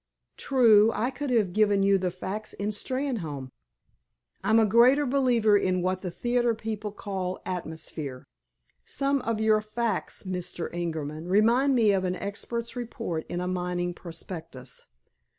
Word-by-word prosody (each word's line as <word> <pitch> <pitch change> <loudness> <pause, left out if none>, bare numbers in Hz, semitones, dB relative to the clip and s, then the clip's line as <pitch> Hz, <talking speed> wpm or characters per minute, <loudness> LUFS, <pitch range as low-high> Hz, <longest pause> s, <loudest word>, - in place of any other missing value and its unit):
"True. 225 -5 +5
I 240 +4 0
could 275 +2 -4
have 215 -7 +2
given 205 -1 +3
you 195 0 +4
the 185 0 0
facts 195 +4 -5
in 205 +1 -3
Steynholme." 210 - -3 0.9
"I'm 215 +3 +4
a 225 - +5
greater 245 +7 +5
believer 245 -5 +3
in 185 -3 +1
what 185 0 0
the 185 - -3
theater 240 +6 0
people 215 -1 -4
call 190 -3 -4
'atmosphere.' 160 -6 -5 0.6
Some 275 0 0
of 230 -2 -1
your 215 -1 +3
facts, 215 -1 -3
Mr. 180 -3 -4
Ingerman, 160 -2 -4
remind 235 +8 +4
me 220 -4 +4
of 190 -1 +1
an 180 0 -1
expert's 235 +5 -4
report 230 -9 -4
in 175 - -3
a 180 - -2
mining 180 -1 -2
prospectus. 165 -6 -8
205 Hz, 145 wpm, -27 LUFS, 180-235 Hz, 0.9 s, True